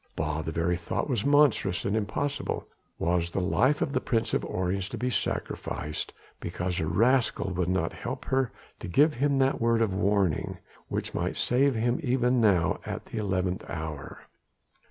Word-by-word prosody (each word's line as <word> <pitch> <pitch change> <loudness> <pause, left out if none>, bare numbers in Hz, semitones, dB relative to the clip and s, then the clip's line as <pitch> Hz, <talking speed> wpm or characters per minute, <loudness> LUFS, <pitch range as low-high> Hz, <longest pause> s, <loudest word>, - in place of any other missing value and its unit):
Bah! 80 0 -1
the 80 - -4
very 85 +2 0
thought 85 - -2
was 120 -7 0
monstrous 140 -10 +3
and 100 - +1
impossible. 125 +7 -2 0.3
Was 85 0 +1
the 90 - -2
life 130 +10 +2
of 140 - -3
the 130 - +1
Prince 115 -2 0
of - - +1
Orange 95 +1 -1
to - - -5
be 125 +1 -1
sacrificed 75 -6 -3 0.3
because 90 0 -3
a 80 - -1
rascal 115 +3 +2
would 90 -1 0
not 95 0 0
help - - -5
her 130 -3 +1 0.3
to - - -6
give 145 - +4
him 140 +3 +1
that 135 -2 +2
word 115 0 +3
of 105 -4 0
warning 100 -3 +1 0.3
which - - -3
might - - -2
save 135 +2 +3
him 120 +2 +1
even 125 -3 +2
now 90 -5 +3
at - - -5
the 110 - -5
eleventh 95 -2 -1
hour? 80 -4 -6
100 Hz, 175 wpm, -28 LUFS, 90-125 Hz, 0.3 s, give